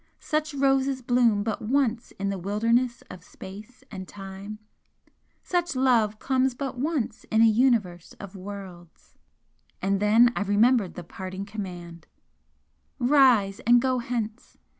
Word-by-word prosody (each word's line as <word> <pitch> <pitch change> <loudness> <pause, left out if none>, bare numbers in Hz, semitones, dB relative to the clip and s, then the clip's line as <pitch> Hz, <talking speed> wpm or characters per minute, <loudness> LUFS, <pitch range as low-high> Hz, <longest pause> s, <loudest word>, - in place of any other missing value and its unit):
Such 305 -1 -2
roses 270 -1 +1
bloom 240 -4 +2
but 220 -1 -3
once 240 -1 0
in 200 +1 -3
the 195 -1 -3
wilderness 230 +6 0
of 180 - -11
space 210 +8 -12
and 190 -3 -7
time; 195 +2 -9 0.9
such 350 -4 -1
love 235 -5 +2
comes 260 +1 0
but 270 0 -4
once 265 -4 -2
in 220 0 +3
a - - +7
Universe 220 -7 +1
of 200 0 -11
worlds!" 185 -3 -10 0.7
And 195 +1 0
then 225 +4 +5
I - - -1
remembered 205 +1 +2
the 175 - -7
parting 190 +3 -7
command: 175 -5 -8 0.9
"Rise 245 -7 +4
and 240 +1 +4
go 255 0 0
hence! 235 -1 -5
220 Hz, 135 wpm, -26 LUFS, 195-255 Hz, 0.9 s, a